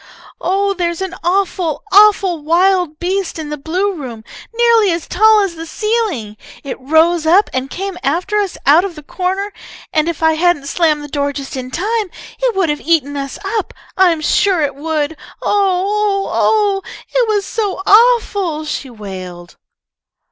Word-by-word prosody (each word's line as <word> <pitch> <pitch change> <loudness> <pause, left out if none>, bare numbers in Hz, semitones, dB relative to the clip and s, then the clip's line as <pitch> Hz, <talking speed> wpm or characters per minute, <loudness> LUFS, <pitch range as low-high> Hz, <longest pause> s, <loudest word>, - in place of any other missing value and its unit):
"Oh, 395 +2 0
there's 345 -2 -2
an 380 -1 -5
awful, 355 -3 0
awful 395 -5 +5
wild 350 0 +2
beast 370 +1 -2
in 310 -2 -6
the 300 - -3
blue 365 +8 -1
room, 250 -9 -8 0.3
nearly 460 -3 +3
as 335 -1 -3
tall 435 +2 +4
as 390 -4 -1
the 325 0 -8
ceiling! 405 - -2 0.3
It 275 - -6
rose 320 +4 +2
up 375 +6 +4
and 260 +1 -2
came 385 +1 -5
after 355 +9 -1
us 405 -3 -1
out 305 +6 +6
of 385 -4 -5
the 305 - -11
corner, 380 +5 -3 0.4
and 310 +1 +2
if 330 -1 -4
I 320 0 +4
hadn't 320 -3 +1
slammed 305 -1 +1
the - - -7
door 285 0 -1
just 275 -1 -6
in 255 -1 -5
time, 415 - -1 0.3
it - - 0
would 380 -4 +1
have 295 0 -2
eaten 295 -4 +1
us 275 -1 -5
up. 420 0 -3 0.2
I'm 350 -4 +3
sure 380 +2 +2
it 280 -1 -1
would! 300 +1 -2 0.3
Oo 385 -2 +2
oo 410 -1 0 0.2
oo! 410 -3 +2 0.3
It - - +2
was 415 -2 0
so 410 -4 -3
awful!" 405 -8 +3
she 290 -3 -4
wailed. 185 -6 -9
350 Hz, 170 wpm, -16 LUFS, 300-400 Hz, 0.4 s, out